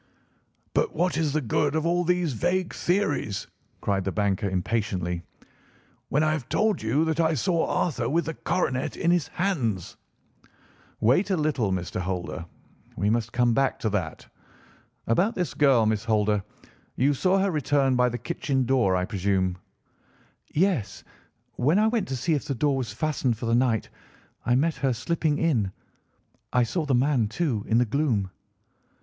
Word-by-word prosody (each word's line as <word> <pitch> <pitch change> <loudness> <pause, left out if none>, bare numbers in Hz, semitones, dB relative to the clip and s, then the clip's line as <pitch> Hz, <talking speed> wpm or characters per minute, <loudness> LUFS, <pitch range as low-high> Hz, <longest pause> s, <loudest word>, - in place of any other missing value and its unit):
"But 465 - 0
what 180 -4 +1
is 155 -2 +1
the 155 - +1
good 145 +5 0
of 160 0 0
all 175 +1 +2
these 180 -4 +1
vague 175 +8 0
theories," 175 - 0 0.4
cried 100 -2 0
the 95 - -2
banker 100 -1 0
impatiently, 90 -2 -1 0.9
"when 150 +3 +2
I 155 - +2
have 150 -6 -3
told 215 -1 +1
you 125 +9 +1
that 160 0 -1
I 160 -1 +3
saw 165 +5 +1
Arthur 125 -8 0
with 170 +4 +1
the 160 - -3
coronet 130 -6 -1
in 170 - +2
his 175 -3 +2
hands?" 125 - -2 1.0
"Wait 130 - +3
a 190 - +1
little, 145 -10 0
Mr. 90 -1 -2
Holder. 90 -2 -4 0.5
We 100 +3 +1
must 115 0 0
come 120 -1 +2
back 135 +3 +1
to 110 - 0
that. 90 -6 -3 0.8
About 185 - +2
this 180 -2 -2
girl, 135 -6 +4
Miss 110 -1 0
Holder. 105 -2 +2 0.5
You 140 +3 +3
saw 185 +7 +2
her 195 0 +2
return 140 -3 +2
by 125 0 +3
the 120 - -4
kitchen 135 -4 -1
door, 120 -7 +2
I 90 0 0
presume?" 95 -2 0 0.9
"Yes; 165 - 0 0.5
when 150 +9 +3
I 215 - +4
went 220 -4 0
to 135 - -3
see 130 +7 0
if 145 - -1
the 140 -3 -2
door 140 +3 +1
was 125 -6 -3
fastened 130 -1 -1
for 120 - -5
the 115 - +1
night 120 -3 +2 0.6
I 120 - +4
met 160 +5 +1
her 135 -2 +1
slipping 155 +4 0
in. 125 - +1 0.8
I 125 -1 +3
saw 155 +6 -2
the 135 - +3
man, 130 -3 +2
too, 115 -2 -1
in 115 - +3
the 125 - +4
gloom." 115 -7 0
130 Hz, 170 wpm, -26 LUFS, 110-160 Hz, 1.0 s, girl